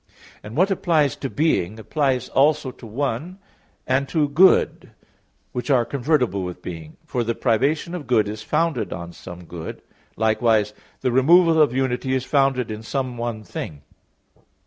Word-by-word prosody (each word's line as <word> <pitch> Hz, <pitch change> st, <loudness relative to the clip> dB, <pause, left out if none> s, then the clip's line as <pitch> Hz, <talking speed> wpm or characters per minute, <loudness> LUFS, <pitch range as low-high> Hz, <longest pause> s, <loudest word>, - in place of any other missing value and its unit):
And 105 Hz, +5 st, -9 dB
what 190 Hz, +4 st, +3 dB
applies 160 Hz, -7 st, +2 dB
to 135 Hz, -, -4 dB
being 110 Hz, -, 0 dB
applies 130 Hz, +3 st, -1 dB
also 140 Hz, -1 st, +2 dB
to 120 Hz, -2 st, -13 dB
one 140 Hz, -, -3 dB, 0.5 s
and 135 Hz, +1 st, 0 dB
to 155 Hz, -3 st, +1 dB
good, 180 Hz, +6 st, +3 dB, 0.6 s
which 125 Hz, +4 st, -5 dB
are 125 Hz, -4 st, +4 dB
convertible 125 Hz, -, 0 dB
with 90 Hz, -1 st, -6 dB
being, 80 Hz, -3 st, -8 dB
for 120 Hz, -, -1 dB
the 115 Hz, 0 st, -2 dB
privation 140 Hz, +8 st, 0 dB
of 175 Hz, -5 st, -6 dB
good 110 Hz, -4 st, +3 dB
is 105 Hz, +1 st, -5 dB
founded 150 Hz, -, -1 dB
in 85 Hz, 0 st, -6 dB
some 90 Hz, 0 st, -10 dB
good; 85 Hz, -1 st, -8 dB, 0.3 s
likewise 110 Hz, -1 st, +2 dB, 0.3 s
the 130 Hz, -, +1 dB
removal 160 Hz, +5 st, +5 dB
of 150 Hz, -, +4 dB
unity 130 Hz, 0 st, -1 dB
is 130 Hz, 0 st, -2 dB
founded 135 Hz, -5 st, +1 dB
in 110 Hz, 0 st, -6 dB
some 130 Hz, +2 st, -3 dB
one 115 Hz, -2 st, -4 dB
thing. 75 Hz, -8 st, -7 dB
125 Hz, 155 wpm, -22 LUFS, 110-145 Hz, 0.6 s, removal